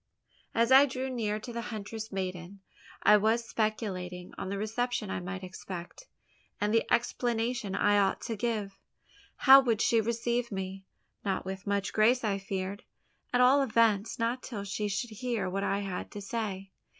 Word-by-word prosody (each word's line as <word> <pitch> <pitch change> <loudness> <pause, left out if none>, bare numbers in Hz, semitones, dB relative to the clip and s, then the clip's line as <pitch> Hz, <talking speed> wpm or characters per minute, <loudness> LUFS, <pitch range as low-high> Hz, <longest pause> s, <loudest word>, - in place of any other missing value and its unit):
As 230 +2 +3
I 270 +2 +8
drew 260 0 -3
near 215 -4 -1
to 240 +2 -8
the 235 - -3
huntress 220 0 -6
maiden, 185 0 -5 0.4
I 210 - +7
was 225 +3 +1
speculating 185 -5 -3
on 190 - -5
the 200 - -2
reception 220 0 -2
I - - -2
might 185 +2 -6
expect, 185 - -8 0.5
and 210 +1 0
the 225 - +1
explanation 235 -3 0
I 205 0 +3
ought 195 -1 +2
to 225 - -3
give. 210 -3 -2 0.6
How 270 0 +9
would 235 -5 +1
she 225 0 +3
receive 235 +1 -1
me? 190 0 -5 0.4
Not 190 -3 -1
with 190 +1 -6
much 200 -1 -1
grace, 235 +4 +4
I 200 -2 0
feared; 195 0 -4 0.5
at 245 - +3
all 265 +3 +6
events, 225 -4 +2
not 235 +2 -1
till 210 -5 -6
she 200 +1 -2
should 205 +4 -3
hear 230 -3 -2
what 195 +2 -2
I 200 0 0
had 195 -2 -4
to 205 - -6
say. 195 -3 -4
215 Hz, 170 wpm, -30 LUFS, 195-235 Hz, 0.6 s, How